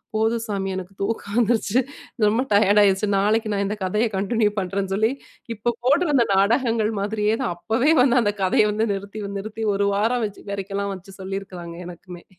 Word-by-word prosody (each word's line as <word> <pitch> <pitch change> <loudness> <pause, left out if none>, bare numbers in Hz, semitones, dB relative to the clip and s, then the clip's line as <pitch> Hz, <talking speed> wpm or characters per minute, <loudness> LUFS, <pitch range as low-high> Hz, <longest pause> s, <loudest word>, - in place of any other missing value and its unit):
போதும் 225 +1 +1
சாமி. 195 -2 -2
எனக்கு 190 +1 -6
தூக்கம் 200 0 -3
வந்துருச்சு 230 0 +2 0.5
ரொம்ப 230 +5 +2
டயர்ட் 205 0 +5
ஆகிடுச்சு 195 +1 +2
நாளைக்கு 215 +2 +1
நான் 200 0 0
இந்த 210 - -2
கதையை 210 +5 +1
கன்டின்யூ 210 +2 +1
பண்ணுறேன்னு 195 +1 -2
சொல்லி 220 +4 +2 0.4
இப்போ 235 +3 0
போட்றந்த 285 -3 +3
நாடகங்கள் 225 +2 +2
மாதிரியே 210 +1 0
தான் 175 - -1
அப்பவே 225 - +1
வந்து 250 -1 +4
அந்த 205 -2 +1
கதையை 200 +3 +3
வந்து 215 +2 0
நிறுத்தி 200 +2 -6 0.2
நிறுத்தி 215 +2 -6
ஒரு 200 0 +1
வாரம் 230 +3 +1
வச்சு 205 -2 -8
வரைக்கெல்லாம் 200 0 -3
வச்சு 190 +1 -13
சொல்லியிருக்கிறாங்க. 190 -3 -6
எனக்குமே! 175 0 -11
205 Hz, 165 wpm, -23 LUFS, 195-225 Hz, 0.5 s, டயர்ட்